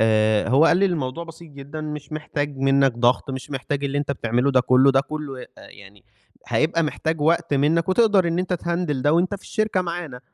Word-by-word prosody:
آآ 110 -1 +2
هو 135 +6 +4
قال 170 - +4
لي 195 +1 +3
الموضوع 165 -2 -3
بسيط 165 0 -13
جدًا، 140 +3 -8
مش 150 -1 -7
محتاج 145 -2 -4
منك 135 -1 +3
ضغط، 120 +4 +1
مش 130 +1 -7
محتاج 140 +1 -3
اللي 140 +1 -1
أنت 140 -1 -2
بتعمله 125 +2 0
ده 130 -2 +4
كلّه، 130 +2 +4
ده 135 - +4
كلّه 140 -2 -7
أ - - -10
يعني 100 0 -16 0.4
هيبقى 165 +1 +1
محتاج 160 0 -2
وقت 165 0 +1
منك، 160 +5 +1
وتقدَر 195 -3 +3
إن 170 - -1
أنت 180 0 -2
تhandle 170 -6 -2
ده 145 - +3
وأنت 180 +4 +1
في 200 - -9
الشركة 215 -4 -1
معانا. 170 -7 -6
145 Hz, 205 wpm, -22 LUFS, 135-170 Hz, 0.4 s, هو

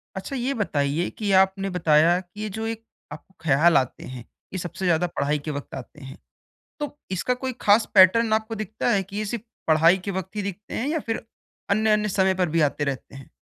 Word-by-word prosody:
अच्छा, 190 +8 -5
ये 260 +2 -1
बताइए 160 - -1
कि 205 -2 -3
आपने 190 +1 +2
बताया 165 -1 +3
कि 185 +3 -11
ये 215 - -3
जो 220 +3 -5
एक 225 0 -4 0.3
आपको 160 +5 -11
ख़्याल 160 +1 +4
आते 130 -2 -1
हैं, 125 -1 -8 0.3
ये - - -2
सबसे 175 +2 -5
ज़्यादा 175 0 +2
पढ़ाई 150 -2 -1
के 155 - -1
वक़्त 145 -1 -7
आते 135 +3 -10
हैं। 135 +1 -10 0.6
तो 295 0 -5
इसका 190 +7 0
कोई 255 0 -4
खास 210 +2 +5
पैटर्न 215 +4 +6
आपको 220 +1 -1
दिखता 215 +3 -3
है 195 -1 +1
कि 200 +2 -9
ये 215 - -2
सिर्फ़ 230 +1 -4 0.2
पढ़ाई 165 +3 +5
के 200 - -2
वक़्त 190 +2 -5
ही 210 - -1
दिखते 200 +1 -7
हैं 255 - -2
या 320 +1 0
फिर 225 0 -3 0.5
अन्य-अन्य 210 0 +2
समय 190 0 +2
पर 180 - +2
भी 165 +1 +1
आते 145 0 +1
रहते 135 -1 -4
हैं? 135 - -12
190 Hz, 215 wpm, -24 LUFS, 160-215 Hz, 0.6 s, पैटर्न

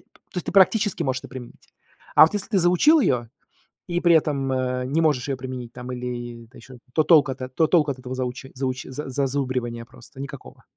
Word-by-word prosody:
то - - -23
есть, 180 - -3
ты - - -2
практически 200 0 +3
можешь 130 -2 -1
это - - -11
применить. 125 -2 -12 0.4
А - - +10
вот 160 - 0
если 205 0 -3
ты 205 -4 +2
заучил 180 - +5
ее 120 - 0 0.6
и 175 0 -1
при 170 -1 +5
этом, 140 -4 +1
э, 125 -1 -1
не 155 +5 +1
можешь 145 -5 +1
ее 135 - -1
применить, 125 -2 -7
там 125 0 -7
или 120 -1 -6
это - - -18
еще, 130 -1 -13 0.2
то 155 - +4
толку 150 -4 +5
от 130 - -16
это 130 0 -6
то 160 - +3
толку 155 -5 +3
от 130 - -8
этого 130 0 -6
зауч 130 +1 -4
зауч 130 0 -3
зазубривания 130 -3 -2
просто 135 +3 -16
никакого. 140 - -10
130 Hz, 210 wpm, -23 LUFS, 125-160 Hz, 0.6 s, А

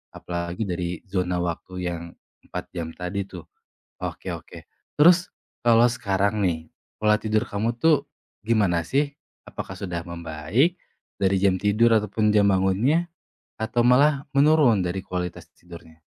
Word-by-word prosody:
apalagi 85 +3 -4
dari 90 -3 -3
zona 90 -2 -1
waktu 85 +1 -5 0.2
yang, 85 -1 -5 0.5
4 - - -5
jam 80 -1 -6
tadi 95 +2 -4
tuh. 90 -4 -10 0.6
Oke - - -4
oke, - - -11 0.3
terus, 175 +3 +6 0.3
kalau 120 0 +5
sekarang 100 -3 0
nih, 80 -3 -1 0.3
pola 105 0 +3
tidur 110 0 0
kamu 110 +4 -2
tuh 160 +2 +3 0.3
gimana 105 -6 +2
sih? 140 - +1 0.4
Apakah - - -7
sudah 90 -3 -4
membaik 85 - -1 0.4
dari 95 0 +3
jam 95 -2 +3
tidur 110 +3 +3
ataupun 105 +1 0
jam 105 -1 +4
bangunnya? 105 - +2 0.5
Atau 120 +2 0
malah 140 +3 +4
menurun 140 -8 +5
dari 90 +2 -2
kualitas 90 -1 -4
tidurnya? 85 -2 -14
100 Hz, 135 wpm, -24 LUFS, 90-120 Hz, 0.6 s, terus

